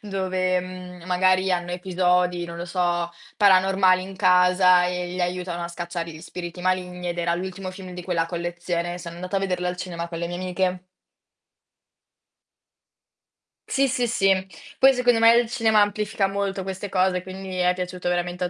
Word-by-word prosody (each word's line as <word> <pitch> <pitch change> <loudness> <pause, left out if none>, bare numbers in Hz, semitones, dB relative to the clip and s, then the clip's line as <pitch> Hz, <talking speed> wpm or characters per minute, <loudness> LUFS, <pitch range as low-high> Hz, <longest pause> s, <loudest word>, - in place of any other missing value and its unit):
dove, 185 -2 -1
mhmm, 180 -1 -9
magari 185 +1 +2
hanno 175 0 -2
episodi, 180 -1 +1
non 170 - -8
lo 170 - -5
so, 175 -1 -1 0.3
paranormali 190 -1 +4
in 190 +1 -9
casa 180 -1 +5
e 180 0 -2
li 180 +1 -5
aiutano 175 -1 -2
a - - -4
scacciare 170 -1 -5
gli 155 - -10
spiriti 175 0 -7
maligni 180 -1 -1
ed 175 - -5
era 170 0 +1
l'ultimo 185 +1 -5
film 185 -1 -10
di 180 - -7
quella 175 -2 0
collezione. 175 0 -3
Sono 170 -1 -8
andata 180 +3 -4
a - - +1
vederlo 180 -2 -1
al 180 0 -2
cinema 170 -2 -5
con 165 -1 -6
le 170 - -2
mie 175 - -4
amiche. 185 0 -1 2.9
Sì, 275 -1 +2
sì, 245 0 0
sì. 195 -4 +2 0.5
Poi 270 +1 +7
secondo 245 -2 +3
me 230 0 +7
il 235 -1 +2
cinema 225 -3 +3
amplifica 205 -1 0
molto 195 -1 -2
queste 190 +1 -5
cose, 185 -1 +1
quindi 190 +1 -8
è 180 0 +3
piaciuto 180 0 -5
veramente 175 0 -1
a - - -2
180 Hz, 170 wpm, -24 LUFS, 175-190 Hz, 2.9 s, Poi